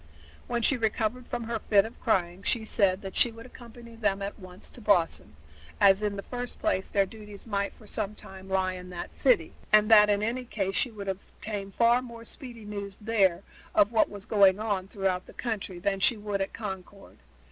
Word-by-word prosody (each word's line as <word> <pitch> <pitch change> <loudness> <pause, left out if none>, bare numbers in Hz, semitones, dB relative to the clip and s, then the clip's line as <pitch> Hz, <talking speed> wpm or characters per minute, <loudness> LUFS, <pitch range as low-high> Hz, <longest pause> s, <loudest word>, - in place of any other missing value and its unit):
When 235 -1 -1
she 275 - +3
recovered 230 +2 -1
from 240 - -3
her 230 0 -3
fit 200 -1 +6
of 225 - -10
crying 180 -4 0
she 220 +2 0
said 195 -3 +2
that 195 - -7
she 240 - +4
would 230 +1 -11
accompany 235 -2 -13
them 200 -3 0
at 200 +2 -5
once 185 -1 -10
to 245 - -12
Boston, 175 - +1 0.4
as 195 +1 +6
in 210 -1 -1
the 200 - -5
first 245 0 -6
place 310 -12 0
their 200 -1 +3
duties 210 -1 -12
might 200 -3 -1
for 215 - -17
some 210 0 -3
time 190 -1 -11
lie 190 -1 +1
in 180 0 -8
that 180 -1 -7
city, 240 - +2 0.2
and 215 +1 +5
that 210 -1 +8
in 205 0 +2
any 245 +3 -1
case 195 -5 -2
she 250 - +1
would 205 -3 -8
obtain 195 +1 -5
far 235 +4 +4
more 235 -2 -10
speedy 240 -7 -9
news 200 -2 -6
there 200 -5 +2 0.3
of 205 +2 +5
what 225 - +3
was 205 -1 -9
going 200 -2 +5
on 200 -4 -1
throughout 190 -2 -1
the - - -13
country 210 -6 -4
than 195 +2 -1
she 230 +4 +4
would 205 -1 -3
at 195 - -2
Concord. 195 -2 -8
205 Hz, 205 wpm, -28 LUFS, 195-230 Hz, 0.4 s, that